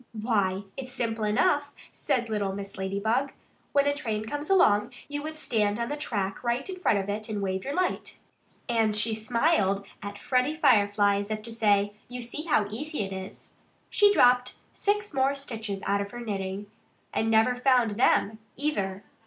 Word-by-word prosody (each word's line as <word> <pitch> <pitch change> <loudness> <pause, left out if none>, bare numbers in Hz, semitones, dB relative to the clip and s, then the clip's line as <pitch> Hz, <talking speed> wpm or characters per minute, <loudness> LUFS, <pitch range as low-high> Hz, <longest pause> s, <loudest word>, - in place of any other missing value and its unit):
"Why, 200 -4 +1
it's 260 -1 -6
simple 225 -4 -2
enough," 290 - +2 0.2
said 240 -2 -1
little 205 -3 -1
Mrs. 200 0 -7
Ladybug. 220 +8 0 0.4
"When 280 0 +3
a 285 - +3
train 220 -6 -3
came 290 +6 -4
along 210 - +4 0.2
you 290 0 -4
would 310 +1 -6
stand 210 -7 0
on 235 - -2
the 295 - -2
track 205 -10 -3
right 240 +2 -1
in 375 -1 -5
front 225 - +3
of 195 0 -2
it 210 +2 -3
and 210 -1 -2
wave 190 -1 -2
your 280 - -3
light." 365 0 -1 0.5
And 230 -3 +2
while 215 - 0
she 215 +2 +2
smiled 220 - +1 0.2
at 205 0 -6
Freddie 255 +6 +1
Firefly 205 -7 +4
as 200 +1 -4
if 215 -1 -3
to 230 - -7
say, 205 -2 +2
"You 250 +1 -6
see 245 +6 -5
how 260 -10 +3
easy 295 +5 -4
it 195 0 -5
is," 190 0 -9 0.4
she 410 -1 +5
dropped 250 -7 +4 0.2
six 415 -1 -1
more 270 +1 +2
stitches 225 -7 -5
out 200 +1 +1
of 200 - -4
her 240 - -8
knitting 200 -3 -4 0.5
and 225 - +1
never 225 +3 +4
found 250 -3 +3
them, 215 -1 +2 0.2
either. 205 -9 -2
225 Hz, 185 wpm, -27 LUFS, 205-270 Hz, 0.5 s, she